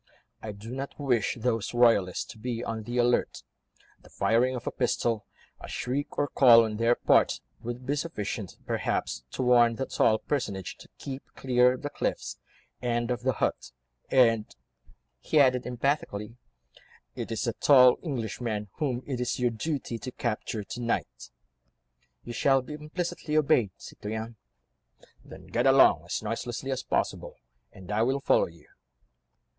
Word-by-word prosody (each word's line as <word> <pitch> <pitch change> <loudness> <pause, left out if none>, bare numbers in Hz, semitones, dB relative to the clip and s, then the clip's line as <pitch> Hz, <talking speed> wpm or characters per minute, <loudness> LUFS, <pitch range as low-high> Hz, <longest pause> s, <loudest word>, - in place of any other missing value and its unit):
I 110 - -5
do 105 +3 -10
not 135 +3 -6
wish 125 -8 +1
those 115 -1 -1
royalists 115 -7 +3
to 110 - -14
be 120 0 -3
on 110 -1 -3
the 120 +3 -5
alert—the 120 0 -3
firing 125 +3 +2
of 125 - -6
a - - -2
pistol, 115 -3 -1 0.3
a - - -9
shriek 140 +4 -3
or 145 - +1
call 120 -5 +7
on 105 -1 -4
their 115 +2 +3
part - - +3 0.2
would 120 +2 -6
be 145 - 0
sufficient, 110 - -4
perhaps, - - -2
to 130 - -3
warn 120 -2 +5
the 135 - -2
tall 110 -3 +2
personage 105 - -3
to - - -15
keep 135 -1 -6
clear 125 -1 +3
of 130 - -8
the 145 - -3
cliffs, - - -3 0.4
and 120 0 -1
of 120 -1 -2
the 130 +1 +1
hut, 85 - -2 0.4
and," 115 -4 +3 0.6
he 150 - +1
added 130 -3 +4
emphatically, 120 -4 -2 0.8
"it - - -5
is 110 -1 -2
the 115 -2 -1
tall 125 -1 +6
Englishman 115 - -3
whom 130 -5 -1
it 130 -3 -3
is 125 - -1
your 125 -1 +2
duty 120 -1 -3
to 130 - -6
capture 110 -3 -3
to 120 +5 -7
night." 115 - -3 0.9
"You 120 - -7
shall 135 +2 +3
be 150 - -8
implicitly 155 0 -3
obeyed, 130 -8 +3
citoyen." 110 +2 -7 0.9
"Then - - -12
get - - 0
along - - +6
as - - -3
noiselessly 125 +3 -4
as 130 -1 -2
possible, - - -2 0.4
and 95 +1 -11
I 105 +1 +1
will 130 +4 +1
follow - - +3
you." 85 -3 -17
120 Hz, 155 wpm, -28 LUFS, 110-130 Hz, 0.9 s, call